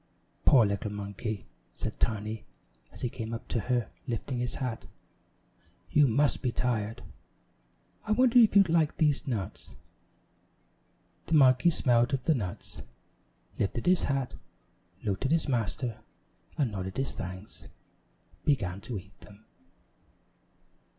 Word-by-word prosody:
"Poor 125 -6 +7
little 100 +1 -2
monkey!" 100 +1 -5 0.3
said - - -5
Tiny 110 -1 -1 0.5
as - - -12
he - - 0
came 115 -1 -5
up 115 - -9
to 120 - 0
her, 120 +1 -1 0.2
lifting 125 +1 -3
his 125 0 -1
hat, 125 -4 -4 1.0
"you 145 -1 +5
must 140 +5 +2
be 125 - 0
tired. 115 -3 -1 1.0
I 215 - -3
wonder 250 +1 +5
if 225 -3 +5
you'd 195 -2 +7
like 160 -2 +2
these 150 -1 +2
nuts." 105 -5 -4 1.5
The 165 - +2
monkey 130 +2 +6
smelled 125 -4 +3
of 130 - -5
the 160 - +3
nuts, 100 -6 -5 0.8
lifted 105 +4 -1
his 180 0 +4
hat, 135 -2 -1 0.7
looked 100 +1 -2
at 135 - +1
his 165 -1 +2
master, 120 -1 0 0.6
and 135 -7 +1
nodding 95 -2 -4
his 135 - 0
thanks, 95 +2 -8 0.8
began 100 -10 0
to 115 +1 -5
eat 95 +1 -12
them. 105 +1 -16
120 Hz, 130 wpm, -29 LUFS, 105-140 Hz, 1.5 s, Poor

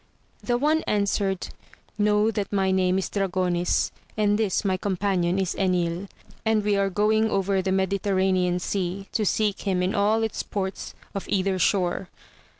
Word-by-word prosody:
The 240 -1 0
one 305 +4 +2
answered, 200 -2 0 0.5
Eaiow 210 +1 +3
that 205 -2 -3
my 195 -2 +1
name 185 0 +2
is 190 - -1
Dragonis, 180 -3 0 0.3
and 205 -1 +3
this 210 -2 0
my 190 -1 +2
companion 185 -2 0
is 190 -2 0
Enil; 180 -1 0 0.4
and 220 -1 +2
we 205 0 +2
are 200 0 +1
going 215 +3 +2
over 195 -1 +1
the 190 0 -1
Mediterranean 190 -1 +1
Sea, 190 +1 -3
to 220 - 0
seek 210 0 0
him 185 -3 0
in 185 - 0
all 215 +2 +2
its 220 - -2
ports 190 -2 -4 0.2
of 195 - -5
either 190 -1 +1
shore. 180 0 +1
195 Hz, 155 wpm, -25 LUFS, 185-205 Hz, 0.5 s, Eaiow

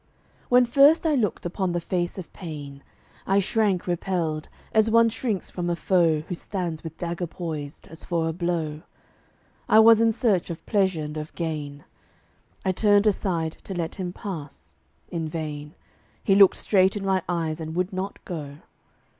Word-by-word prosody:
When 250 0 +6
first 280 +7 +5
I 315 - +3
looked 220 -11 0
upon 180 +1 -1
the 175 - 0
face 175 +1 -2
of 185 - -8
Pain 145 -6 -8 0.5
I 195 - +3
shrank 200 -2 +1
repelled, 170 -3 -2 0.2
as 220 0 +4
one 230 +1 +5
shrinks 225 -4 -3
from 175 -1 -3
a 170 - +1
foe 170 -4 +2
Who 170 - -6
stands 175 -3 -4
with 160 -1 -8
dagger 175 0 -3
poised, 155 -4 -6
as 160 - -12
for 165 -2 -1
a 165 - -1
blow. 165 -3 -2 0.9
I - - +6
was 225 0 +8
in 230 0 +4
search 210 -6 +1
of 170 - -7
Pleasure 190 -7 +1
and 150 +1 -6
of 155 0 -6
Gain; 150 -3 -4 0.8
I 190 - +3
turned 205 +1 +3
aside 175 -6 0
to 195 - -6
let 165 -2 -2
him 185 -3 -4
pass: 165 -7 -8 0.4
in 165 -2 -3
vain; 150 -2 -5 0.5
He 195 - +3
looked 195 -1 +7
straight 190 0 +3
in 195 - -5
my 190 -1 +2
eyes 165 -2 -1
and 160 0 -5
would 180 +2 -1
not 190 +2 -5
go. 145 -5 -6
175 Hz, 170 wpm, -25 LUFS, 160-200 Hz, 0.9 s, was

